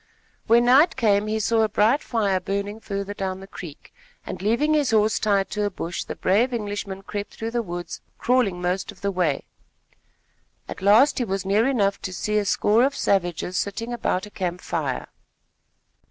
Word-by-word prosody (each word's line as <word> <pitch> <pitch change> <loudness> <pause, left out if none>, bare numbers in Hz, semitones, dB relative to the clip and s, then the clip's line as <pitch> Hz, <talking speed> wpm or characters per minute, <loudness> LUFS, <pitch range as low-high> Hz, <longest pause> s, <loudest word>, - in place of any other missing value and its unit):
When 235 +1 +5
night 275 +7 +5
came, 210 -4 +2
he 220 +1 -1
saw 225 +1 +2
a 220 - +2
bright 220 +7 +3
fire 205 -5 0
burning 200 +3 -3
further 200 -2 -4
down 190 -2 -4
the 195 - -10
creek, 170 -6 -11 0.3
and, - - -6
leaving 235 +10 +2
his 295 -3 +2
horse 215 -1 +3
tied 200 -2 +1
to 210 0 -1
a - - +1
bush, 175 -3 -5
the - - -6
brave 235 +7 +2
Englishman 205 -3 -4
crept 205 +1 -6
through 225 +1 -4
the 240 0 0
woods, 175 -4 -6 0.2
crawling 240 -8 +1
most 180 +2 -2
of - - -18
the 200 - 0
way. 175 -7 0 1.2
At - - -8
last 225 +10 +5
he - - +1
was 195 -3 -3
near 210 +5 +3
enough 200 -7 +1
to 185 - -5
see 210 +3 0
a 205 - -2
score 215 +4 +3
of 275 +2 +1
savages 180 -1 0
sitting 230 +4 -3
about 200 -5 -1
a 210 - -13
camp 180 -2 -3
fire. - - -3
205 Hz, 185 wpm, -24 LUFS, 190-230 Hz, 1.2 s, When